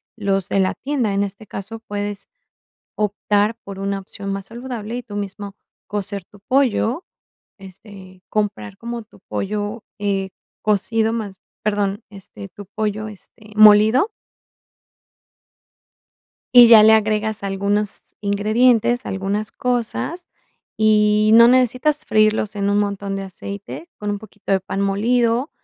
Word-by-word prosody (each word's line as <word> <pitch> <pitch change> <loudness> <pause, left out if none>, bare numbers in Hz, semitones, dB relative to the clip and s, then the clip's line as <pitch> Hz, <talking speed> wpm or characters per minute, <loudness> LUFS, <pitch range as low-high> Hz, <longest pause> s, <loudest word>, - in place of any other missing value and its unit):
los 195 -3 -1
de 195 - +1
la 190 -1 +2
tienda. 260 -7 -2
En 200 - +1
este 200 +2 -7
caso, 200 +3 -7
puedes 205 -1 -5 0.7
optar 210 +1 0
por 195 -1 -8
una 195 0 -2
opción 195 +1 -7
más 195 0 -4
saludable, 235 -1 -6
y 245 - -4
tú 205 -4 -9
mismo 200 0 -6 0.3
cocer 200 -2 -4
tu 205 - -18
pollo, 260 - +1 0.5
este, 190 -1 -14
comprar 195 - -2
como 235 0 -5
tu 215 -2 -21
pollo, 205 +2 -3 0.2
eh, 195 -2 -1 0.3
cocido 220 +2 +1
más, 215 -4 -4 0.3
perdón, 205 0 -1
este, 195 0 -11
tu 205 +3 -11
pollo, 215 +1 -3
este, 210 +1 -15
molido. 215 - +6 2.5
Y 240 -1 +11
ya 220 -2 +9
le 220 - +7
agregas 215 -1 +1
algunos 200 +1 -1 0.2
ingredientes, 225 +4 +2
algunas 200 +3 -2
cosas, 250 +8 -2 0.5
y 215 0 +4
no 235 +1 +8
necesitas 255 +4 +2
freírlos 215 0 +2
en 200 0 0
un 205 - +2
montón 200 -1 -2
de 195 - -4
aceite, 200 - -8
con 210 - -5
un 205 - -3
poquito 205 -2 -6
de 190 - +3
pan 195 +1 -4
molido, 230 +6 +1
210 Hz, 135 wpm, -20 LUFS, 200-225 Hz, 2.5 s, Y